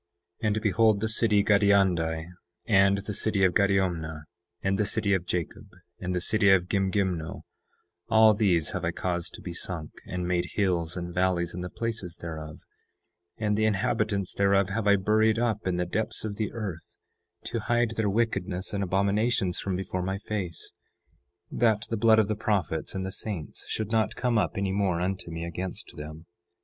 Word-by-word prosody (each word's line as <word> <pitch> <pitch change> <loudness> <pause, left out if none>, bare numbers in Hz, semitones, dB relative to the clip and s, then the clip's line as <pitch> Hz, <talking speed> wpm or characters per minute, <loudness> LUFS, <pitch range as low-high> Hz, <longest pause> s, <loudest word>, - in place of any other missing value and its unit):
9:8 - - +2
And 105 +1 +1
behold, 110 0 +3
the 110 - 0
city 110 -2 +2
of - - -4
Gadiandi, 95 -6 +3 0.4
and 100 -2 +5
the 105 +1 -4
city 100 -1 0
of 90 -2 +4
Gadiomnah, 90 -6 +1 0.4
and 95 +1 +1
the 105 - +2
city 105 -3 +1
of 90 -2 0
Jacob, 90 -2 -3 0.3
and 90 0 -3
the - - +1
city 105 +3 +2
of 95 -2 +4
Gimgimno, 95 -4 -1 0.7
all 110 -1 +7
these 90 -7 +2
have 95 -3 -4
I 85 - +1
caused 85 0 -3
to - - -11
be 90 - -5
sunk, 85 -3 -4 0.2
and 90 0 -3
made 90 -1 0
hills 90 -4 0
and 85 0 -5
valleys 90 -1 +1
in 90 - -5
the 90 - -4
places 110 -6 -4
thereof; 80 -2 -7 0.8
and 105 -1 0
the 110 +1 +2
inhabitants 100 -1 0
thereof 100 -1 +3
have 105 +1 -1
I 100 - +7
buried 110 +3 +3
up 115 -4 0
in 90 - +1
the 90 - 0
depths 110 +5 -2
of 100 -2 -4
the 110 - -2
earth, 100 -8 -6 0.5
to 115 - -3
hide 120 +1 +1
their 110 -2 0
wickedness 100 -4 -1
and 100 -1 0
abominations 100 +1 +1
from 95 -2 -2
before 95 0 -3
my 95 +2 -2
face, 100 -5 -5 0.8
that 110 -3 +2
the - - +1
blood 110 +1 +5
of 110 -2 +4
the 110 - -1
prophets 95 -8 -1
and 95 0 -2
the 95 - -4
saints 95 -6 -4
should 110 -1 -3
not 110 -1 +1
come 120 -3 +1
up 105 - 0
any 100 -1 0
more 95 -3 +1
unto 90 -1 -2
me 85 0 -4
against 90 +2 -6
them. 75 +2 -8
95 Hz, 185 wpm, -27 LUFS, 90-105 Hz, 0.8 s, all